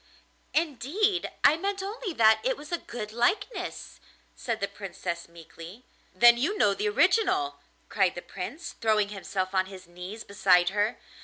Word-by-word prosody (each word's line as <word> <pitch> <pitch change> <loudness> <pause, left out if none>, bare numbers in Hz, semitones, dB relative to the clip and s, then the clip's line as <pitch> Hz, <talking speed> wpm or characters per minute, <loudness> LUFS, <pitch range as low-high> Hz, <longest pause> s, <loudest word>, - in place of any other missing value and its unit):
'Indeed, 335 - 0
I 300 - +6
meant 395 +2 -2
only 410 +1 -4
that 220 -5 +5
it - - 0
was 300 +2 -11
a 345 - 0
good 215 -3 -7
likeness,' 370 - -2 0.4
said 230 -3 -3
the 200 - -1
Princess 185 -4 -6
meekly. 170 +6 -12 0.3
'Then 240 0 +6
you 330 - 0
know 205 - +4
the 210 +1 -1
original,' 205 - +2 0.3
cried 190 -3 +1
the 175 - -7
Prince, 275 - -7
throwing 215 -2 +2
himself 195 -2 -4
on 185 -1 +2
his 190 -1 -11
knees 180 +5 -9
beside 180 -3 +3
her. 205 +4 0
220 Hz, 155 wpm, -27 LUFS, -, 0.4 s, I